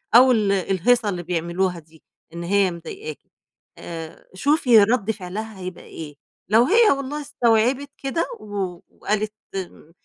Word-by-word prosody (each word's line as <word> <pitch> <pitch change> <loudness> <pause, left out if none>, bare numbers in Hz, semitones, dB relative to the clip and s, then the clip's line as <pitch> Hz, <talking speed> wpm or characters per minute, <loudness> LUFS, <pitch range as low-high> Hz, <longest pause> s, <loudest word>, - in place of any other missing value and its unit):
أو 255 +1 +8
ال 210 -4 +2
الهيصة 195 +4 +2
اللي 175 -2 -3
بيعملُوها 175 +1 -1
دي 160 0 -21 0.3
إن 170 0 -5
هي 195 0 +2
مضايقاكِ، 390 - -8 0.6
آآ 165 -1 -8
شوفي 250 - +5
رَدّ 220 0 +1
فعلها 210 +1 -6
هيبقى 185 -1 -7
إيه، 150 -3 -9 0.3
لو 225 +3 +6
هي 440 - +5
والله 275 +2 -2
استوعبت 260 -1 +1
كده، 275 +5 -1
و 190 -4 -4
وقالت 210 0 -2 0.2
م 175 -4 -7
205 Hz, 135 wpm, -23 LUFS, 180-250 Hz, 0.6 s, أو